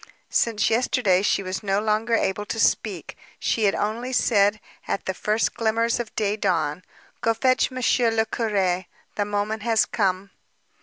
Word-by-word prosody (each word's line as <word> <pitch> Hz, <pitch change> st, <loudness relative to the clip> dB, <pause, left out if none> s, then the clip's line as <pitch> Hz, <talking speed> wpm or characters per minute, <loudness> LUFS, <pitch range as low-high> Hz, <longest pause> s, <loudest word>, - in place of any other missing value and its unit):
Since 220 Hz, -3 st, +1 dB
yesterday 225 Hz, -5 st, +2 dB
she 200 Hz, -, +1 dB
was 185 Hz, 0 st, -4 dB
no 200 Hz, -1 st, 0 dB
longer 220 Hz, +2 st, +1 dB
able 205 Hz, -1 st, -1 dB
to 225 Hz, -, -4 dB
speak. -, -, 0 dB, 0.2 s
She 220 Hz, -, 0 dB
had 195 Hz, -, +2 dB
only 230 Hz, +5 st, -2 dB
said, 210 Hz, -4 st, +3 dB, 0.3 s
at -, -, -2 dB
the 190 Hz, -, -1 dB
first 215 Hz, +4 st, 0 dB
glimmers 230 Hz, +1 st, 0 dB
of 235 Hz, -2 st, -6 dB
day 210 Hz, -1 st, 0 dB
dawn: 175 Hz, -5 st, -1 dB, 0.4 s
"Go 230 Hz, 0 st, +1 dB
fetch 255 Hz, +2 st, +2 dB
Monsieur 250 Hz, -2 st, +1 dB
le 225 Hz, 0 st, +1 dB
Curé, 190 Hz, -6 st, -1 dB, 0.3 s
the 205 Hz, -, -1 dB
moment 205 Hz, +1 st, -2 dB
has 225 Hz, 0 st, +2 dB
come." 195 Hz, -2 st, -1 dB
215 Hz, 160 wpm, -24 LUFS, 195-230 Hz, 0.4 s, said